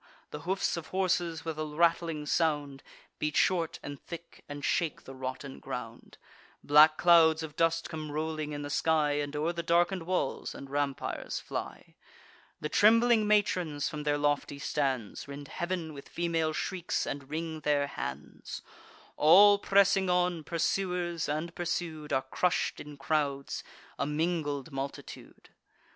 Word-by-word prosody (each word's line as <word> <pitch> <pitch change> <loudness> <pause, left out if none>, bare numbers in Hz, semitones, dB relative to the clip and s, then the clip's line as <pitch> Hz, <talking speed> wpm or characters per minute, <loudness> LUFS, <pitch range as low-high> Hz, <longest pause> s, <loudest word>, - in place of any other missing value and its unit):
The - - -5
hoofs 190 -2 0
of 165 - -6
horses, 175 -3 0
with 160 -1 -4
a - - 0
rattling 165 0 +1
sound, 145 -3 0 0.4
Beat 150 0 -1
short 170 -4 +2
and 145 -1 -7
thick, 170 0 -10
and 145 0 -5
shake 165 -4 0
the 135 - -10
rotten 130 +1 -6
ground. - - -7 0.5
Black 155 +2 +7
clouds 165 -2 +5
of 150 -2 -7
dust 165 0 +1
come 155 -2 -6
rolling 155 0 -3
in 145 0 -4
the 145 - -5
sky, 155 -1 +2
And 145 0 -3
o'er 155 +3 0
the 170 - -3
darken'd 175 +2 +2
walls 180 -7 -1
and 135 -1 -9
rampires 145 -1 -2
fly. - - -6 0.7
The 150 - -2
trembling 225 +4 +5
matrons, 180 -8 +1
from 150 -2 -5
their 145 0 +1
lofty 145 -1 0
stands, 135 -7 -2
Rend 140 0 -8
heav'n 175 -3 -3
with 140 -1 -11
female 165 -2 0
shrieks, 175 +2 -2
and 140 -1 -5
wring 160 +1 -4
their 145 -1 +1
hands. 70 - -7 0.5
All 200 +6 +7
pressing 195 -1 +3
on, 180 -2 +1
pursuers 175 0 -1
and 155 +3 -2
pursued, 170 -4 -3
Are 130 - +1
crush'd 175 +6 0
in 145 -1 -10
crowds, 140 -1 -1 0.4
a 140 - 0
mingled 150 -2 -1
multitude. 135 0 -7
155 Hz, 145 wpm, -30 LUFS, 145-175 Hz, 0.7 s, Black